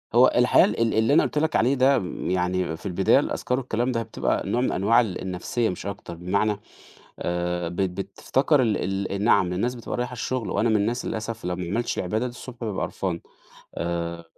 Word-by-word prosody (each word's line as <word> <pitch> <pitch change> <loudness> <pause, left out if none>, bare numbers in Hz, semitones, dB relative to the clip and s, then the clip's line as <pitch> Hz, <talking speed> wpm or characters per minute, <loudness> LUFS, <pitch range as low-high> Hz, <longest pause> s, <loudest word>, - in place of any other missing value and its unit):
هو 125 +2 +7
الحقيقة 125 0 +6
ال 105 - -2
ال 115 - +2
اللي 110 +5 +3
أنا - - +6
قُلت - - -3
لك 160 +1 +1
عليه 130 +5 +3
ده 130 0 +4
م 90 - -4
يعني 90 -2 0
في - - -17
البداية 90 -3 +3
الأذْكار 125 +1 -1
والكلام 125 0 -1
ده 115 -1 -1
بتبقى - - -1
نوع 120 - +1
من - - +1
أنواع 110 +6 +4
ال 100 -6 -4
النَفْسية 95 +5 -1
مش 90 - -6
أكتر 100 -4 -6
بمعنى، 100 +4 0 0.6
آآ 85 0 -2
بت 90 +1 -1
بتفتكر 130 - +1
ال 100 -3 -1
ال 100 +1 -2
نِعَم 95 -6 +4
الناس 120 +7 -1
بتبقى 120 - -5
رايحة 125 +1 -2
الشغل 125 -1 -3
وأنا 110 +4 +1
من 110 - +3
الناس 115 +5 0
للأسف 115 -1 -4
لو 90 0 -2
ما 90 - -4
عملتش 120 +3 -1
العبادة 110 +6 -1
دي - - -4
الصبح 120 0 -10
بابقى 110 -4 -2
قرْفان، 90 -3 -3 0.5
آآ 85 0 -3
105 Hz, 205 wpm, -25 LUFS, 90-120 Hz, 0.6 s, هو